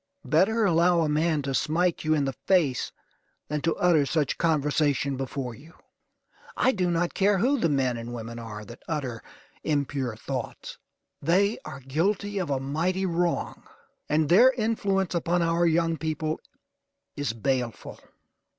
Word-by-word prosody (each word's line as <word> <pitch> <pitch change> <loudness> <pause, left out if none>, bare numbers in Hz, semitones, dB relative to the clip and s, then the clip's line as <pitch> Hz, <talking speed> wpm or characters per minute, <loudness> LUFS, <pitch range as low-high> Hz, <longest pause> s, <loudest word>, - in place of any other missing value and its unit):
Better 210 +8 +3
allow 170 -1 +4
a 160 - +1
man 155 0 +1
to 135 0 -2
smite 165 +5 +1
you 155 0 +2
in 145 -2 +1
the 135 - -2
face 155 -6 +1 0.6
than 150 0 -1
to 165 - 0
utter 170 -5 +3
such 145 0 -1
conversation 145 -3 +1
before 130 -1 -4
you. 155 +8 -15 0.8
I 260 - +4
do 185 -6 0
not 170 0 0
care 200 +1 +3
who 260 +8 +2
the 165 - +2
men 130 -4 +1
or 115 +1 -7
women 115 0 -6
are 105 -2 -7
that - - -12
utter 130 -8 -3 0.4
impure 140 -5 -1
thoughts; 125 +2 -6 0.4
they 195 +8 +2
are 135 - -8
guilty 195 +9 -1
of 180 - -2
a 135 -2 0
mighty 165 +8 -1
wrong; 175 -1 -1 0.4
and 150 0 +2
their 235 - +7
influence 205 -5 0
upon 170 0 +1
our 170 +1 +2
young 165 0 +2
people 155 0 -2 0.8
is 145 -6 -2
baleful. 125 0 -2
155 Hz, 150 wpm, -26 LUFS, 135-175 Hz, 0.8 s, their